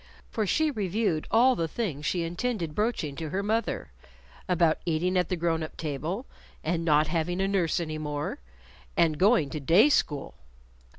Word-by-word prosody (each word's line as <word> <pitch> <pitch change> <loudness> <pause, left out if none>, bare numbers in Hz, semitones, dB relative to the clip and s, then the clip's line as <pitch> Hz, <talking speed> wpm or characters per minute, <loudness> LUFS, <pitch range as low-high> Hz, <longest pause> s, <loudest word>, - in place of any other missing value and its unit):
For 215 -2 -1
she 310 +8 +2
reviewed 200 - -1
all 250 +3 +5
the 165 -6 -1
things 155 - -3
she 175 -2 0
intended 175 -1 -2
broaching 210 -9 -1
to 160 -2 -4
her 190 +6 -2
mother 215 - -1 0.6
about 170 -3 +3
eating 175 +2 0
at 180 -2 +1
the 180 - 0
grown 165 -1 0
up 155 - -6
table, 160 - -3 0.4
and 165 +1 -1
not 155 -2 +4
having 170 +2 -1
a 195 - +2
nurse 190 -5 +1
any 155 -2 -4
more, 150 -1 -3 0.6
and 155 -3 +3
going 185 - +4
to 155 - -3
day 170 - +5
school. 145 - 0
170 Hz, 170 wpm, -28 LUFS, 155-200 Hz, 0.6 s, all